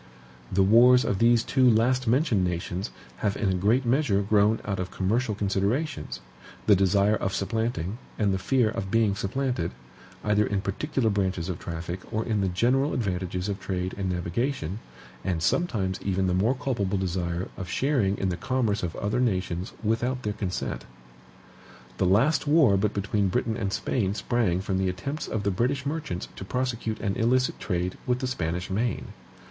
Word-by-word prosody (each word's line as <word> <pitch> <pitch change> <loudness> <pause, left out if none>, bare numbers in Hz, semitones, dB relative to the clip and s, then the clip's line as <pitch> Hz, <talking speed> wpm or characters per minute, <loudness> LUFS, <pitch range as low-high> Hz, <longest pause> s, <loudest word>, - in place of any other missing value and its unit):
The 95 +1 +3
wars 120 +5 +6
of 95 - 0
these 115 0 +4
two 130 -2 +4
last 125 +3 +2
mentioned 120 - +3
nations 90 +1 -2 0.3
have 100 -2 -1
in 100 - 0
a - - +2
great 105 +8 +2
measure 120 -5 +2
grown 105 +2 +3
out 100 -2 -2
of 90 0 -3
commercial 105 +5 0
considerations, 105 - -1 0.4
the 105 - +6
desire 100 +2 +3
of 95 -2 -2
supplanting 110 -1 -2 0.2
and 100 -3 +2
the 95 - -1
fear 120 +3 +2
of 95 -3 -4
being 110 -1 +3
supplanted, 100 -2 -1 0.5
either 105 0 +3
in 100 -1 -1
particular 115 +3 -1
branches 95 -3 -1
of 90 - -3
traffic 85 +1 -5
or 110 0 -1
in 110 -3 0
the 95 - +1
general 125 +10 +1
advantages 90 -4 -2
of 100 -1 -3
trade 95 -1 -3
and 95 -1 -2
navigation, 90 - -2 0.4
and 85 -4 -1
sometimes 100 - 0
even 95 -1 0
the 90 - +1
more 105 +8 +2
culpable 115 -8 -1
desire 90 -1 -2
of 90 -2 -6
sharing 115 -5 +1
in 95 - 0
the 85 - -2
commerce 120 -5 0
of 85 -2 -3
other 105 +4 -1
nations 95 -5 -1
without 120 +4 0
their 105 - -1
consent. 100 -3 -3 1.1
The 95 - +2
last 135 - +3
war 145 -9 +5
but 105 +2 0
between 100 0 0
Britain 110 +4 0
and 100 -3 -2
Spain 100 -1 -1
sprang 105 -7 0
from 95 -1 -1
the 95 -1 +1
attempts 140 +12 -4
of 105 - -2
the 100 - +1
British 130 +8 0
merchants 140 - -3
to - - -6
prosecute 115 -1 -2
an 100 -2 -1
illicit 125 +2 +2
trade 90 -1 -2
with 125 0 +2
the 130 - -3
Spanish 90 -7 -2
main. 115 +5 -1
100 Hz, 175 wpm, -26 LUFS, 95-120 Hz, 1.1 s, wars